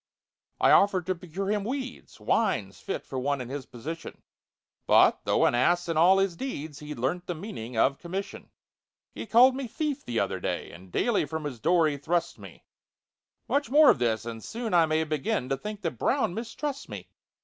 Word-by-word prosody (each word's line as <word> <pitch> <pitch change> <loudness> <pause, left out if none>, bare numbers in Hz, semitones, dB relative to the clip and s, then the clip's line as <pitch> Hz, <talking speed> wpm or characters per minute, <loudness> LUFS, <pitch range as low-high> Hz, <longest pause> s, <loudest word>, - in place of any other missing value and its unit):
I - - +5
offered 190 -3 +4
to 185 - 0
procure 185 +3 -4
him 210 -1 0
weeds— 255 +3 -6
Wines - - 0
fit 395 - -5
for 130 - -4
one 140 +2 -1
in 125 -1 -6
his 135 -1 -6
position— 150 +7 -8 0.6
But, - - +5
though - - +3
an - - +3
ass 175 +9 +2
in 165 - -1
all 175 +5 +6
his 195 -2 +1
deeds, 160 - -5
He'd 150 -2 -7
learnt 155 +9 -2
the 175 - -3
meaning 140 - -7
of 135 +4 +2
"commission." 190 +3 -6 0.6
He - - -7
called 250 +4 +6
me 270 -1 -4
"thief" 295 +2 -3
the 120 -2 -2
other - - -1
day, - - -3
And 90 +2 -14
daily 230 - +1
from 160 +2 -5
his 135 -5 -5
door 170 +4 +3
he 145 -2 -2
thrusts 165 +4 -1
me; - - -13 0.8
Much 285 +1 0
more 295 +2 +7
of - - -2
this, 115 -2 0
and 115 -1 -6
soon 230 -2 -4
I 170 -2 +5
may 155 +1 +1
Begin 150 -4 -2
to 135 - +1
think 210 +6 -7
that - - -3
BROWN 240 -9 +1
mistrusts 260 +6 -5
me. - - -8
170 Hz, 195 wpm, -27 LUFS, 140-220 Hz, 0.8 s, more